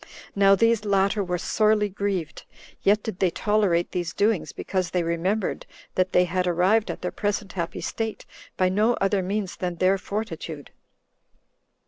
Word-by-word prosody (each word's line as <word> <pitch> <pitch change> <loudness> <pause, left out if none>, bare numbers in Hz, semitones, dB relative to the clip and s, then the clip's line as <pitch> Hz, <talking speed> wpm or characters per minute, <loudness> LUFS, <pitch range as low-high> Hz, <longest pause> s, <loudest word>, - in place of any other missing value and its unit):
Now 195 0 +6
these 230 +1 +2
latter 200 0 +2
were 180 -1 -2
sorely 210 +3 +2
grieved, 195 -5 -3 0.4
yet 205 +1 +3
did 220 -5 -5
they 185 - +3
tolerate 195 -2 +1
these 175 -1 -3
doings, 210 -2 +1
because 185 -2 -2
they 180 -1 0
remembered 180 +5 -1 0.3
that 185 0 +1
they 180 - +4
had 180 +1 -1
arrived 185 +6 +2
at - - -5
their - - -2
present 205 -1 -2
happy 170 -3 -4
state 225 -1 -4 0.3
by 185 - +3
no 215 +6 +2
other 195 0 +1
means 195 +1 -3
than 180 -1 -3
their 185 +3 +2
fortitude. 165 -8 -5
195 Hz, 155 wpm, -25 LUFS, 180-210 Hz, 0.4 s, Now